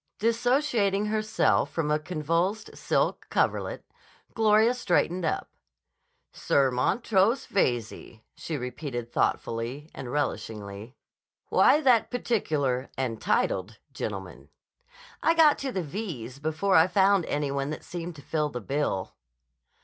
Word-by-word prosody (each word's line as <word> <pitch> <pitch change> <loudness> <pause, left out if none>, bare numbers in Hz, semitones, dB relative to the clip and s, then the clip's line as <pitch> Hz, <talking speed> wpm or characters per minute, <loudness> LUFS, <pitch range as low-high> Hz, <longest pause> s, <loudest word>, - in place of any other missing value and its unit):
Dissociating 230 -3 +1
herself 215 0 +1
from 150 -3 -2
a 150 - +2
convulsed 170 +6 -2
silk - - 0
coverlet, - - -1 0.5
Gloria 220 +1 +4
straightened 185 -6 0
up. - - -1 0.9
"Sir 135 -2 +2
Montrose 205 - +1
Veyze," 120 - -2
she 160 - -5
repeated 125 -2 -5
thoughtfully 120 +7 -2
and 135 - -7
relishingly. 110 -5 -4 0.5
"Why 300 - +5
that 250 -6 +4
particular 150 - -1
and 120 -4 -2
titled 95 +4 0 0.2
gentleman?" 100 -8 -6 0.7
"I 330 - +3
got 315 -3 +5
to 270 -1 -3
the 190 -6 -2
V's 140 - -6
before 155 +6 0
I 160 +2 +7
found 195 0 +3
any 145 -1 -1
one 140 0 -2
that 155 - -6
seemed 175 0 -6
to 145 - -12
fill 150 +2 -1
the 125 - -5
bill." 130 -5 -2
155 Hz, 120 wpm, -27 LUFS, 130-210 Hz, 0.9 s, I